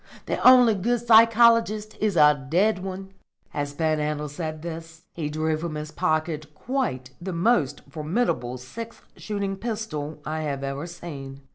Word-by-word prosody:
The - - -2
only 250 -3 +8
good 235 +4 -1
psychologist 230 -1 +5
is 210 -4 +1
a 150 -3 +5
dead 195 +5 +2
one." 190 0 -6 0.4
As 145 0 -3
Panhandle 150 -1 -1
said 155 +1 -5
this, 165 -1 -8
he 155 -3 -3
drew 155 +1 0
from 160 -1 -4
his 150 0 -5
pocket 155 -1 -1
quite 215 - -3
the 185 +1 -4
most 170 - +1
formidable 150 - -1
six 225 - -9
shooting 200 -2 -3
pistol 190 -10 -4
I 155 +1 -3
have 140 -3 -3
ever 140 +4 -4
seen. 140 -6 -8
165 Hz, 145 wpm, -25 LUFS, 150-215 Hz, 0.4 s, only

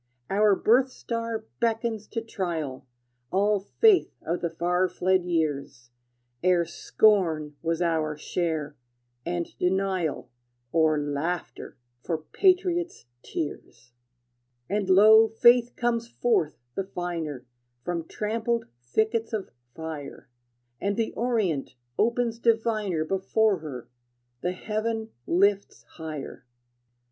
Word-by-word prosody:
Our 205 0 +4
birth 250 +7 +4
star 230 -2 -4
beckons 225 -2 -1
to 230 - -3
trial 165 -12 -4 0.4
All 205 +2 +2
faith 390 - +3
of 170 +3 -2
the 170 - 0
far 180 +3 +1
fled 185 0 +1
years, 145 -7 -2 0.5
Ere 180 -1 +4
scorn 165 -3 +2
was 165 +1 0
our 155 -3 0
share, 155 -2 -2 0.5
and 175 -1 -3
denial, 185 -8 0 0.4
Or 160 -2 +3
laughter 145 +3 -3 0.3
for 165 - -1
patriot's 355 - +1 0.2
tears. 125 -5 -6 0.8
And 200 0 -1
lo, 215 +4 +8
Faith 240 +2 +4
comes 235 -1 0
forth 235 -10 0 0.2
the 195 - -2
finer 165 -8 -4 0.4
From 170 -2 -3
trampled 230 +2 -1 0.2
thickets 220 - 0
of 210 -3 -3 0.2
fire, 155 -4 -7 0.5
And 200 0 0
the 225 -1 0
orient 200 - -1 0.2
opens 235 0 +1
diviner 220 -8 +1
Before 195 +2 +1
her; 140 -6 -7 0.5
the 180 - -1
heaven 220 +3 -3 0.2
lifts 200 +3 +2
higher. 155 -5 -7
185 Hz, 105 wpm, -26 LUFS, 160-225 Hz, 0.8 s, lo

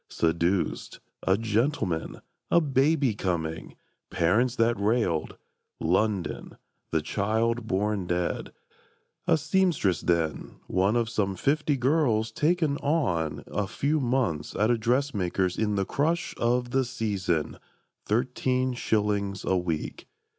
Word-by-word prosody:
Seduced; 85 +3 0 0.3
a 95 - +4
gentleman; 110 - -1 0.3
a - - +5
baby 140 -3 +2
coming; 85 -5 -3 0.3
Parents 110 +9 +2
that 115 0 +2
railed; 100 -6 0 0.4
London; 95 +3 -1 0.3
the 80 -2 0
child 110 +5 0
born 100 -1 0
dead; 90 0 -2 0.8
A - - +5
seamstress 155 - +1
then, 85 -3 -1
one 95 +4 +1
of 120 -1 +1
some 105 -4 -1
fifty 145 - +1
girls 125 -5 +2
"Taken 160 -2 +1
on" 90 - 0
a 105 -1 -2
few 145 +8 0
months 120 - -1
at 110 +3 +2
a 120 - +2
dressmaker's 105 -7 0
In 105 -1 0
the 100 -1 0
crush 165 - 0
of 120 +1 0
the 135 +1 +2
"season;" 100 - -2 0.5
thirteen 125 +2 0
shillings 105 -4 -1
a 95 - +2
week! 85 -4 -3
110 Hz, 120 wpm, -27 LUFS, 95-130 Hz, 0.8 s, a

